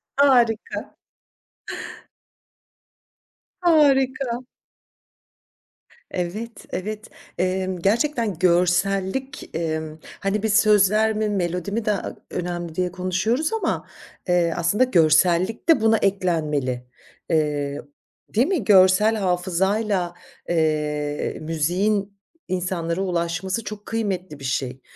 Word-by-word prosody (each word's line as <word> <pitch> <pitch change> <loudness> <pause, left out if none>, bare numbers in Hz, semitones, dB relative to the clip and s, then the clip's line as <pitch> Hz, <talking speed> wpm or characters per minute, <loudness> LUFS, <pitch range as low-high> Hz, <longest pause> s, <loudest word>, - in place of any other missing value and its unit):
Harika. 245 -6 +2 2.7
Harika. 270 -7 +3 1.7
Evet, 210 +6 -5
evet. 210 +3 -5 0.3
Eee, 185 +1 0 0.2
gerçekten 230 - +1
görsellik, 190 +7 +1
eee, 160 -1 -1 0.4
hani, 195 +1 -1
biz 220 -2 +1
sözler 215 +1 +4
mi 215 0 0
melodi 180 -1 -2
mi 220 +1 -2
daha 205 -3 -1 0.2
önemli 175 -2 -4
diye 180 0 -1
konuşuyoruz 185 - -1
ama, 445 - -1 0.4
eee, 175 -2 +2
aslında 175 +8 +2
görsellik 175 - +3
de 310 -9 +6
buna 225 0 +4
eklenmeli. 155 - 0 0.5
Eee, 145 -2 0 0.5
değil 240 +6 +2
mi? 360 - 0
Görsel 190 +2 +5
hafızayla, 190 0 0 0.4
eee, 150 -3 -1
müziğin 190 +6 0 0.3
insanlara 180 -1 -2
ulaşması 180 +3 -2
çok 210 -1 -8
kıymetli 185 -8 -3
bir 135 - -8
şey, 130 0 -2
185 Hz, 90 wpm, -23 LUFS, 170-215 Hz, 2.7 s, de